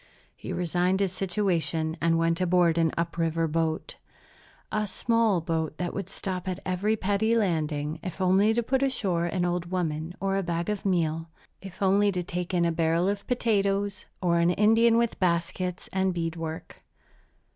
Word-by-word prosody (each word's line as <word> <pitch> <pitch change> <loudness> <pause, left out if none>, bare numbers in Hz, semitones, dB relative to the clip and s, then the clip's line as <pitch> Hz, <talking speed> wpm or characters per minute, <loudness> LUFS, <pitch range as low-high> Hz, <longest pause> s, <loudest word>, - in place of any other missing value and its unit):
He - - -7
resigned 180 +2 0
his 195 -2 +1
situation 175 -4 0
and 165 0 +3
went 165 +1 +1
aboard 175 -2 +3
an 165 -1 +2
up 170 0 -2
river 165 0 +1
boat, 160 0 -2 0.7
a 210 0 0
small 225 -2 +1
boat 160 -2 -2
that 175 -1 -3
would 195 -2 -4
stop 185 -2 -4
at 185 0 -2
every 190 +4 0
petty 210 +3 +1
landing, 155 -6 -1
if 185 0 -6
only 190 +3 +4
to 235 - +1
put 265 +3 0
ashore 190 -11 0
an 180 0 -1
old 175 0 -2
woman 165 -2 -2
or 195 0 0
a - - +1
bag 170 0 -2
of 205 -1 -3
meal, 165 -3 0 0.3
if 195 0 -7
only 200 +2 +4
to 180 -1 -2
take 180 +1 -4
in 175 -2 +2
a 170 - +2
barrel 165 +2 +1
of 200 0 -2
potatoes 205 -4 0 0.2
or 170 -1 +3
an 170 +1 +3
Indian 225 +5 +4
with 235 -1 0
baskets 180 0 -1
and 190 -1 +1
bead 165 -1 -2
work. 160 -1 -7
180 Hz, 175 wpm, -27 LUFS, 165-195 Hz, 0.7 s, only